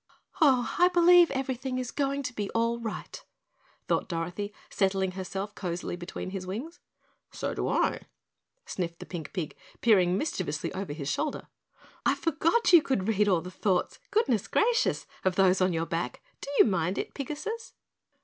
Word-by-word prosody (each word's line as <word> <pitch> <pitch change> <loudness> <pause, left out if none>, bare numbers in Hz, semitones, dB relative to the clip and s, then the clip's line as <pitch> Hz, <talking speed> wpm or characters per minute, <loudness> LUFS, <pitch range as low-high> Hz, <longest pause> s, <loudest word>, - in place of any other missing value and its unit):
"Oh, 260 -5 +4
I 355 - +7
believe 350 -1 +6
everything 260 -1 -2
is 250 -2 -3
going 280 0 -1
to 255 -1 -4
be 205 -3 -3
all 230 +1 +1
right," 225 -2 -6 0.6
thought - - 0
Dorothy, 175 +4 -3 0.2
settling 190 -1 +1
herself 190 +2 -5
cozily 175 -3 -4
between 175 +1 -6
his 190 -1 -5
wings. 255 - -5 0.5
"So - - -3
do - - -2
I," - - +1 0.6
sniffed 170 -2 -4
the - - -9
pink 165 -5 -6
pig, 170 -6 -4 0.2
peering 185 -5 +4
mischievously 185 - -2
over 190 -5 -4
his 145 -2 -5
shoulder. 290 - -2 0.5
"I - - +3
forgot 335 +7 +2
you 340 - +10
could 215 -10 -1
read 210 -1 +2
All 180 -4 +3
the 180 +2 -8
thoughts, 185 -2 0
Goodness 260 - +1
Gracious! 465 +1 +2 0.2
Of 185 -1 +1
those 190 -1 +4
on 185 0 +3
your 165 -1 -1
back, 170 +11 -3 0.2
Do - - -6
you - - +8
mind 185 -3 0
it - - -3
Pigasus?" 305 - -5
205 Hz, 165 wpm, -28 LUFS, 180-275 Hz, 0.6 s, you